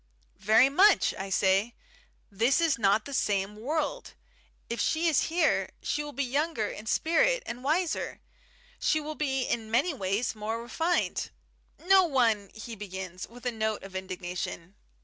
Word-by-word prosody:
"Very 220 +5 +5
much," 380 +9 +4
I 195 +1 -6
say. 195 +4 +2 0.6
"This 230 - +2
is 325 -7 +2
not 205 +1 +3
the 280 - -7
same 205 -4 0
world. 300 - -3 0.5
If 235 - -4
she 330 +1 +1
is 315 -4 +3
here, 330 -1 +1
she 295 - -1
will 295 - -7
be 280 0 -2
younger 270 -3 -1
in 215 - -9
spirit - - +2
and 240 +2 -6
wiser. 320 +4 -1 0.6
She 310 - +2
will 305 +1 -5
be 270 -3 -1
in 225 -3 -2
many 270 +10 +2
ways 200 -1 -1
more 220 +1 -4
refined 325 +10 -1 0.3
" - - -39
"No 380 +1 +5
one 230 - +1
" - - -26
he 225 +1 -7
begins, 190 -3 -7
with 245 +2 -14
a 245 - +1
note 220 -2 -2
of 195 -1 -10
indignation. 180 -1 -5
235 Hz, 165 wpm, -28 LUFS, 205-310 Hz, 0.6 s, Very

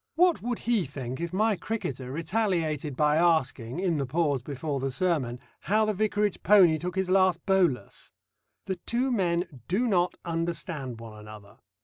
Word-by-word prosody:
What 350 0 +3
would 240 0 -2
he 230 -5 0
think 130 0 -6
if 170 - -3
my 215 +3 +2
cricketer 135 - -4
retaliated 160 - -1
by 150 0 +3
asking, 160 -6 +1
in 180 -4 +1
the 140 -2 -2
pause 145 -2 0
before 140 +2 -4
the 135 +1 -1
sermon, 130 -5 -1 0.2
how 215 +2 +2
the 215 - 0
vicarage 210 0 0
pony 180 -5 +6
took 180 +2 -4
his 190 -1 0
last 185 -3 +3
bolus? 175 - 0 0.5
The 190 -1 -3
two 250 +3 0
men 175 - -1
do 205 +8 +1
not 180 -6 +1
understand 165 -7 -3
one 110 -2 -10
another. 105 -1 -13
170 Hz, 160 wpm, -27 LUFS, 135-195 Hz, 0.5 s, pony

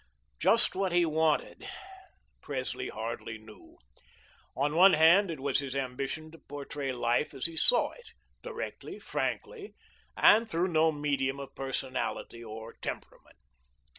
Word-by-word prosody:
Just - - +4
what 190 -1 0
he 175 -1 +4
wanted, 160 - 0 0.7
Presley 130 -3 -4
hardly 110 0 -5
knew. 110 -1 -16 0.8
On 145 +3 +1
one 185 +3 +8
hand, 170 +5 +6
it 160 -4 -4
was 135 0 +1
his 135 -1 -5
ambition 135 +4 -3
to 165 - -14
portray 140 -1 -5
life 120 +3 0
as 135 - -4
he 165 -1 -3
saw - - +4
it 480 -2 -15 0.3
directly, 480 -1 -6
frankly, 430 -4 -4 0.4
and 225 +2 +6
through 175 +1 0
no 160 -1 +4
medium 140 -2 -1
of 140 - -8
personality 130 -3 -4
or 110 0 -8
temperament. - - -7
145 Hz, 135 wpm, -30 LUFS, 130-170 Hz, 0.8 s, one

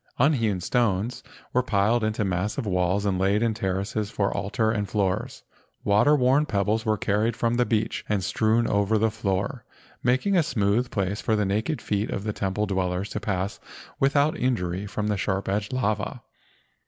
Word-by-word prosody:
Unhewn 115 -8 +2
stones 110 +3 0 0.3
were 125 - +4
piled 110 0 +1
into 110 -1 0
massive 95 +7 -1
walls 90 +1 +1
and 95 -2 0
laid 100 +3 +2
in 115 -1 +1
terraces 100 +1 -2
for 100 -2 -1
altar 110 +2 0
and 105 -3 -2
floors. 95 -3 -1 0.4
Water 105 +9 +4
worn 135 +3 +3
pebbles 105 +1 0
were 110 0 +2
carried 105 +3 0
from 115 0 0
the 125 0 +2
beach 110 -1 0
and 105 -3 0
strewn 110 +5 +2
over 100 +1 +2
the 110 +1 +2
floor, 100 -2 -2 0.4
making 130 +11 +2
a 175 - +5
smooth 120 -4 +1
place 100 0 -2
for 110 - +1
the 105 -1 +1
naked 110 +10 -1
feet 105 +1 -1
of 100 - -3
the 105 -1 -2
temple 100 +2 -1
dwellers 95 0 -2
to - - -3
pass 100 -1 -2 0.4
without 140 +2 +3
injury 100 -6 -1
from 105 +1 -3
the 105 -1 0
sharp 95 0 -1
edged 100 +1 -1
lava. 120 -1 -1
105 Hz, 175 wpm, -25 LUFS, 100-115 Hz, 0.4 s, a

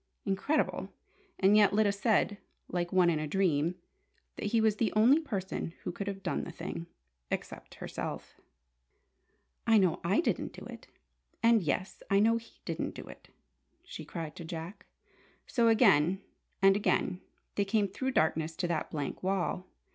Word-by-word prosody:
Incredible! 200 +11 0 0.5
And 195 +2 +5
yet, 205 -2 +5
Lyda 210 -1 +4
said, 205 0 +1 0.3
like 175 -1 -2
one 180 -2 +4
in 155 - 0
a 155 - -2
dream, 170 -1 +1 0.6
that - - -3
he 225 +2 +2
was 220 -1 +3
the 225 - +1
only 240 +8 +6
person 190 - -4
who - - -2
could 200 +3 -6
have 195 -1 -5
done 175 - -1
the - - -6
thing 170 - -6 0.4
except - - -5
herself! - - -6 1.3
"I 225 -1 +6
know 185 -5 +3
I 185 +5 +2
didn't 340 - -1
do - - -10
it, - - -10 0.6
and 230 -1 +5
yes, 185 +4 -2
I 195 - +4
know 225 +2 +4
he 230 0 -13
didn't - - -3
do - - -8
it!" - - -13 0.5
she - - -8
cried 165 -3 -6
to 170 - -6
Jack. 165 +4 -7 0.6
So, 235 -2 +2
again 195 - +5 0.4
and 195 0 +7
again 190 -2 0 0.3
they 200 - +1
came 200 +1 +1
through 260 +7 -3
darkness 160 -2 +1
to 175 - -1
that 160 -2 -1
blank 145 -3 -4
wall! 185 -1 -1
195 Hz, 160 wpm, -31 LUFS, 170-215 Hz, 1.3 s, and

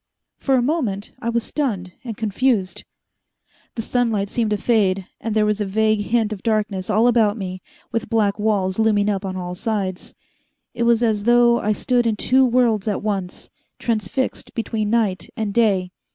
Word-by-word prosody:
For 270 - +2
a 250 - +2
moment 240 -9 -1
I 235 - -2
was 235 -1 0
stunned 200 - -2
and 230 -5 -6
confused. 220 -2 0 0.9
The 225 - -3
sunlight 225 -5 0
seemed 230 -1 0
to 210 - +1
fade, 195 -4 +1
and 225 -1 -3
there 215 -1 +3
was 210 0 0
a - - +2
vague 215 +2 +2
hint 220 -2 +1
of 195 - -8
darkness 210 -4 -1
all 215 +2 +3
about 225 -3 +3
me, 185 -2 -5 0.3
with 230 0 -2
black 210 -3 +1
walls 205 -2 0
looming 210 -2 +3
up 195 -1 -2
on 190 -1 -4
all 180 -1 -4
sides. 190 -1 -3 0.6
It 235 0 0
was 235 0 +3
as 215 -3 +1
though 240 0 +5
I 215 - +1
stood 240 +2 +1
in 220 - +1
two 260 +5 +3
worlds 235 -4 +2
at 205 - -1
once, 195 -4 -4 0.3
transfixed 230 +3 -2
between 220 -2 -2
night 215 -5 0
and 215 -3 -2
day. 195 -6 +2
215 Hz, 180 wpm, -21 LUFS, 200-235 Hz, 0.9 s, though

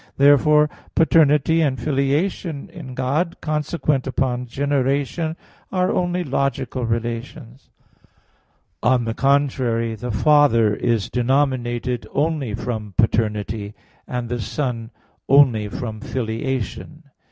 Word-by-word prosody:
Therefore 150 +2 +5 0.3
paternity 160 0 +4
and 135 -5 0
filiation 145 +4 -1
in 130 -7 -9
God, 150 +7 -1
consequent 150 -2 -1
upon 125 -1 -1
generation, 140 +4 -1 0.4
are 185 -1 +1
only 180 0 0
logical 135 -3 -2
relations. 115 +3 -5 1.1
On 120 0 +2
the 115 - -2
contrary, 130 -4 +1
The 120 +3 -6
Father 115 -3 +4
is 115 -1 -1
denominated 125 -2 0
only 145 -7 0
from 110 -4 -5
paternity; 105 -2 0 0.3
and 125 -1 -3
the 120 0 -3
Son 120 -4 -3 0.4
only 130 -7 +5
from 110 -1 -5
filiation. 130 +4 -4
130 Hz, 100 wpm, -21 LUFS, 115-145 Hz, 1.1 s, Therefore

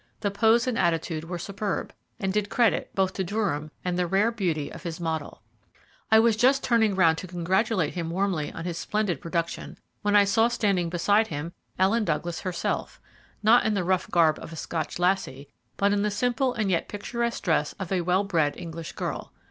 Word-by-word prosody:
The 205 - 0
pose 225 +3 +3
and 250 -3 -1
attitude 165 -1 0
were 175 +1 -4
superb, 200 +3 -3 0.3
and 190 -1 -1
did 205 0 0
credit 235 -2 +2
both 190 -1 +1
to 190 - -2
Durham 175 -6 -2 0.2
and 180 0 -1
the 180 - +1
rare 200 +6 +2
beauty 175 -10 -2
of - - -9
his 170 -2 -5
model. 160 -3 -4 0.7
I 220 - +8
was 225 0 +5
just 260 +5 +3
turning 220 -4 +3
round 165 -3 +4
to 185 - -7
congratulate 180 +1 0
him 170 -2 -3
warmly 180 -3 -1
on 165 - -7
his 170 -2 -3
splendid 210 -4 -1
production, 170 -1 -3 0.2
when 205 0 +1
I 205 - +8
saw 225 +3 +3
standing 200 -8 0
beside 205 +6 +2
him 160 +1 -5 0.2
Ellen 205 +5 +3
Douglas 170 -1 -2
herself, 180 -2 -3 0.4
not 230 +3 +6
in 220 -1 +1
the 190 - 0
rough 185 0 0
garb 165 -3 +3
of - - -9
a - - -7
Scotch 160 0 -4
lassie, 175 -7 0 0.3
but 200 0 +3
in 205 - +1
the 210 - +1
simple 245 +4 0
and 215 -4 0
yet 170 - 0
picturesque 235 +3 -3
dress 155 -4 +1
of 190 -2 -7
a 185 -2 +1
well 180 +3 +2
bred 165 -7 0
English 165 -2 -7
girl. - - -4
190 Hz, 195 wpm, -26 LUFS, 170-210 Hz, 0.7 s, I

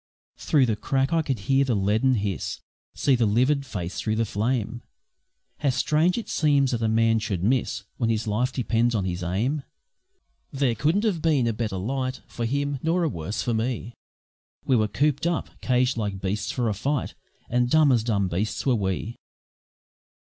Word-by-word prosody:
Through 140 -4 +3
the 110 -3 0
crack 135 +6 0
I 165 - +3
could 135 -8 -2
hear 135 +6 +3
the 130 -4 0
leaden 110 +6 +2
hiss! 100 -5 -3 0.4
See 140 - +2
the 120 -3 +3
livid 130 +6 +2
face 90 -4 -4
through 110 - -1
the 115 +1 +1
flame! 115 +2 -1 0.8
How 140 - +1
strange 155 - +2
it 235 - -4
seems 140 -4 +2
that 120 -2 -1
a 115 - +1
man 115 0 +3
should 100 -5 -3
miss 125 +4 0
When 115 -3 0
his 110 -1 0
life 115 +5 0
depends 120 -2 +1
on 100 -3 0
his 90 -1 -3
aim! 110 - -1 0.9
There 135 -4 +1
couldn't 160 - +1
have 195 -8 0
been 150 -6 +2
a 115 - +1
better 105 -3 -3
light 130 +6 -3
For 120 - -4
him, 140 +2 -1
nor 170 +2 +1
a 165 - +2
worse 85 - -4
for 120 - 0
me. 115 0 -2 0.7
We 130 - +3
were 110 -2 +3
coop'd 145 +7 +1
up, 170 -1 -2
caged 125 0 +1
like 100 -3 -2
beasts 100 +2 -2
for 125 -2 -1
a 110 - +1
fight, 140 +7 -2 0.3
And 125 0 +1
dumb 155 0 +5
as 120 -4 +3
dumb 100 -5 +1
beasts 95 +5 -2
were 130 - +3
we. 105 +2 -2
120 Hz, 185 wpm, -25 LUFS, 105-140 Hz, 0.9 s, dumb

